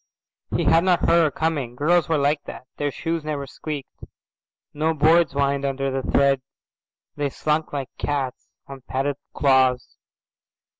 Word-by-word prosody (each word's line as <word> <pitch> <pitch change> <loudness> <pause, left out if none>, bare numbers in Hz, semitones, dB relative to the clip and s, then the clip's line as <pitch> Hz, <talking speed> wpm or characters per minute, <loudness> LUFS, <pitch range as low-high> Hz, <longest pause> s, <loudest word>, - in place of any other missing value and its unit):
He - - +1
had 165 +1 +4
not 180 -2 +3
heard 170 0 +4
her - - +2
coming. 145 -5 -2
Girls 160 +3 +2
were 160 - +2
like 145 +1 +1
that. 125 - -9
Their 145 - -1
shoes 165 +3 -3
never 150 -2 -3
squeaked. 145 0 -7 0.7
No 160 +2 0
boards 160 +1 +4
whined 140 0 0
under 135 0 -1
the 135 0 -1
tread. 140 -1 +3 0.7
They 145 -1 -1
slunk 150 +3 -1
like 140 -3 -5
cats 140 -3 -3 0.2
on 135 -1 -10
padded 135 +2 -2 0.2
claws. 130 -3 +2
145 Hz, 150 wpm, -23 LUFS, 135-155 Hz, 0.7 s, had